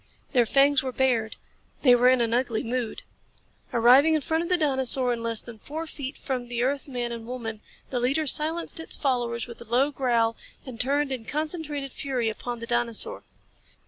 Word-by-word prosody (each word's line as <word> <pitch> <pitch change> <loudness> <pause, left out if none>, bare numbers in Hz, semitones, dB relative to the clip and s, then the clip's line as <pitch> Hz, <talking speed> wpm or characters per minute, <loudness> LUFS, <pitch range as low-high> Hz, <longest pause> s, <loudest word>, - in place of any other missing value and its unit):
Their 240 -3 +4
fangs 275 +2 +4
were 260 - -3
bared. 245 -4 +1 0.5
They 250 -3 +7
were 245 +1 +5
in 255 -1 +4
an 230 -1 +1
ugly 240 -3 0
mood. 240 -1 -3 0.7
Arriving 255 +7 +6
in 310 - +1
front 320 +4 0
of 340 - -4
the 360 - +4
dinosaur 265 -4 +1
and 235 - -4
less 230 -1 -2
than 230 -2 -11
four 315 +7 -6
feet 280 -3 -6
from 255 -3 -4
the 240 0 -2
earth 275 +2 -1
man 245 -3 -3
and 230 -1 -6
woman, 225 -4 -5 0.3
the 250 - 0
leader 275 +6 +1
silenced 320 +4 +3
its 325 - -1
followers 240 -4 -1
with 235 -1 -11
a - - -9
low 255 +5 +2
growl 235 -4 +1 0.3
and 245 -4 -4
turned 280 +2 0
in 255 -3 -3
concentrated 300 -2 -3
fury 255 -5 -1
upon 240 +2 -5
the 230 - -7
dinosaur. 240 - -1
255 Hz, 190 wpm, -26 LUFS, 235-285 Hz, 0.7 s, They